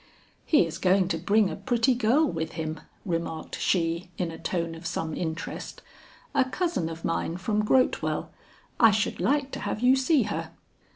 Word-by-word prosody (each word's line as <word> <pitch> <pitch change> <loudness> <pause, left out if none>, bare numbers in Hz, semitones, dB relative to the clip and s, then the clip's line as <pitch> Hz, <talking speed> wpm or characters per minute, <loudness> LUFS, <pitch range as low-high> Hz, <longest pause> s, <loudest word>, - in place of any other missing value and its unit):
"He 300 - +5
is 165 +1 -6
going 190 -1 +3
to 165 - 0
bring 200 +3 +3
a - - -4
pretty 245 0 +2
girl 250 +6 +3
with 160 - -3
him," 160 -1 -4 0.3
remarked 165 -3 -3
she, 170 0 0
in 175 -3 -2
a 165 - -9
tone 170 -2 -2
of 165 +1 -7
some 160 -1 -3
interest, 165 -1 -5 0.5
"a 270 - +4
cousin 260 - -1
of 165 0 -7
mine 165 0 -1
from 210 +3 0
Grotewell. 255 +4 +1 0.5
I 225 - +8
should 215 0 0
like 280 0 +1
to - - -5
have 210 - -3
you 250 +1 +6
see 270 +2 +3
her." - - -3
185 Hz, 175 wpm, -27 LUFS, 165-250 Hz, 0.5 s, I